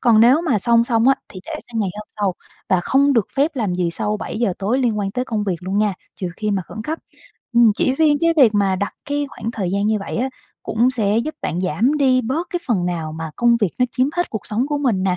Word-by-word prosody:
Còn 225 Hz, -3 st, +5 dB
nếu 250 Hz, +7 st, +6 dB
mà 260 Hz, -11 st, +1 dB
xong 235 Hz, +3 st, +3 dB
xong 235 Hz, 0 st, +2 dB
á 270 Hz, -, +6 dB
thì 185 Hz, -, -10 dB
để -, -, -6 dB, 0.2 s
sang 225 Hz, -2 st, -2 dB
ngày 195 Hz, -, 0 dB
hôm 210 Hz, -, -8 dB
sau 200 Hz, -3 st, 0 dB, 0.3 s
và 185 Hz, -2 st, +3 dB
không 280 Hz, +8 st, +3 dB
được 230 Hz, -6 st, +2 dB
phép 285 Hz, +3 st, +2 dB
làm 210 Hz, -8 st, -1 dB
gì 180 Hz, -2 st, 0 dB
sau 210 Hz, +5 st, -2 dB
7:00 220 Hz, -1 st, -2 dB
tối 215 Hz, +7 st, 0 dB
liên 235 Hz, -5 st, +1 dB
quan 195 Hz, -1 st, -1 dB
tới 250 Hz, +4 st, -2 dB
công 220 Hz, -4 st, -2 dB
việc 185 Hz, -4 st, -1 dB
luôn 190 Hz, +3 st, -2 dB
nha, 210 Hz, -2 st, +2 dB, 0.2 s
trừ 185 Hz, -, -3 dB
khi 215 Hz, -1 st, -2 dB
mà 195 Hz, -2 st, 0 dB
khẩn 220 Hz, -, -7 dB
cấp. 315 Hz, +7 st, -3 dB, 0.5 s
Ừm, 235 Hz, -2 st, +6 dB
chỉ 260 Hz, -, +1 dB
riêng 300 Hz, 0 st, +3 dB
cái 335 Hz, 0 st, +3 dB
việc 235 Hz, -7 st, +6 dB
mà 195 Hz, -2 st, +2 dB
đặt 200 Hz, +2 st, -2 dB
cái 290 Hz, 0 st, -1 dB
khoảng 230 Hz, -, -5 dB
thời 195 Hz, -6 st, -3 dB
gian 200 Hz, +2 st, 0 dB
như 215 Hz, -1 st, +2 dB
vậy 195 Hz, -, -5 dB
á 255 Hz, +3 st, 0 dB, 0.3 s
cũng 235 Hz, +3 st, +2 dB
sẽ 220 Hz, -3 st, +1 dB
giúp 310 Hz, +7 st, -3 dB
bạn 175 Hz, -, -2 dB
giảm 205 Hz, -, +1 dB
đi 260 Hz, -2 st, +4 dB
bớt 270 Hz, +9 st, -2 dB
cái 350 Hz, -, -2 dB
phần 190 Hz, -8 st, +1 dB
nào 165 Hz, -3 st, -3 dB
mà 160 Hz, 0 st, -5 dB
công 240 Hz, 0 st, +4 dB
việc 205 Hz, -, +2 dB
nó 250 Hz, -, +4 dB
chiếm 255 Hz, +2 st, +1 dB
hết 350 Hz, -, 0 dB
cuộc 220 Hz, -, -5 dB
sống 235 Hz, +6 st, 0 dB
của 295 Hz, -1 st, -1 dB
mình 235 Hz, -10 st, +1 dB
nè, 185 Hz, -1 st, +1 dB
225 Hz, 270 wpm, -20 LUFS, 195-255 Hz, 0.5 s, nếu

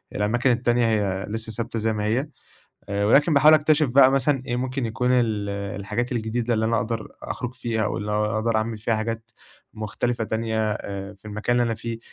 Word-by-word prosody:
الأماكن 120 Hz, +5 st, +2 dB
التانية 120 Hz, 0 st, +2 dB
هي 100 Hz, -3 st, 0 dB
لسه 110 Hz, +1 st, -2 dB
ثابتة 115 Hz, +1 st, -3 dB
زي 110 Hz, 0 st, 0 dB
ما 105 Hz, -, -2 dB
هي، 125 Hz, +7 st, 0 dB, 0.6 s
آآ 100 Hz, 0 st, 0 dB
ولكن 145 Hz, +7 st, +4 dB
باحاول 150 Hz, +2 st, +7 dB
أكتشف 155 Hz, -1 st, +3 dB
بقى 130 Hz, +1 st, +6 dB
مثلًا 135 Hz, 0 st, +1 dB
إيه 120 Hz, -, -1 dB
ممكن 130 Hz, 0 st, -2 dB
يكون 125 Hz, +3 st, -1 dB
ال 110 Hz, -5 st, +1 dB
الحاجات 100 Hz, +4 st, -3 dB
الجديدة 115 Hz, +1 st, -1 dB
اللي 110 Hz, 0 st, 0 dB
أنا 115 Hz, +1 st, +1 dB
أقدَر 110 Hz, +1 st, -2 dB
أخرُج 125 Hz, 0 st, -5 dB
فيها 115 Hz, -4 st, -1 dB
واللي 105 Hz, -1 st, -3 dB
أقدَر 110 Hz, +2 st, 0 dB
أعمل 110 Hz, 0 st, -1 dB
فيها 115 Hz, +2 st, 0 dB
حاجات 115 Hz, +1 st, -4 dB, 0.4 s
مختلِفة 110 Hz, +2 st, -2 dB
تانية 110 Hz, -1 st, -1 dB
آآ 100 Hz, -1 st, -6 dB
في 100 Hz, -, -30 dB
المكان 110 Hz, +3 st, -1 dB
اللي 120 Hz, -, +3 dB
أنا 115 Hz, -, -1 dB
فيه 115 Hz, +1 st, -5 dB
115 Hz, 190 wpm, -24 LUFS, 105-120 Hz, 0.6 s, باحاول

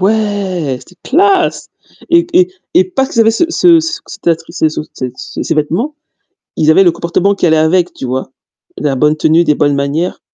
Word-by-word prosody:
Ouais, 195 Hz, -8 st, -1 dB
c'etait 180 Hz, -, -18 dB
classe 385 Hz, +5 st, +2 dB, 0.4 s
et 340 Hz, 0 st, +4 dB
et 360 Hz, +1 st, +3 dB, 0.2 s
et 360 Hz, -, +5 dB
pas 270 Hz, -7 st, -1 dB
qu'ils 230 Hz, -, -1 dB
avaient 225 Hz, -, +5 dB
ce 225 Hz, +9 st, +1 dB
ce 340 Hz, 0 st, +4 dB
ce 330 Hz, +1 st, -4 dB, 1.4 s
ce -, -, -1 dB
vêtement, 175 Hz, -, -1 dB, 0.6 s
ils 155 Hz, 0 st, +3 dB
avaient 190 Hz, +5 st, +5 dB
le 175 Hz, -, +4 dB
comportement 170 Hz, +4 st, 0 dB
qui 190 Hz, -, -1 dB
allait 160 Hz, -1 st, +3 dB
avec, 170 Hz, +3 st, +1 dB
tu -, -, -7 dB
vois? 130 Hz, +1 st, -4 dB, 0.5 s
La 140 Hz, -2 st, -1 dB
bonne 150 Hz, +3 st, +2 dB
tenue, 160 Hz, +2 st, +3 dB
des 150 Hz, -3 st, +2 dB
bonnes 145 Hz, -2 st, +1 dB
manières. 140 Hz, +6 st, -2 dB
180 Hz, 170 wpm, -13 LUFS, -, 1.4 s, et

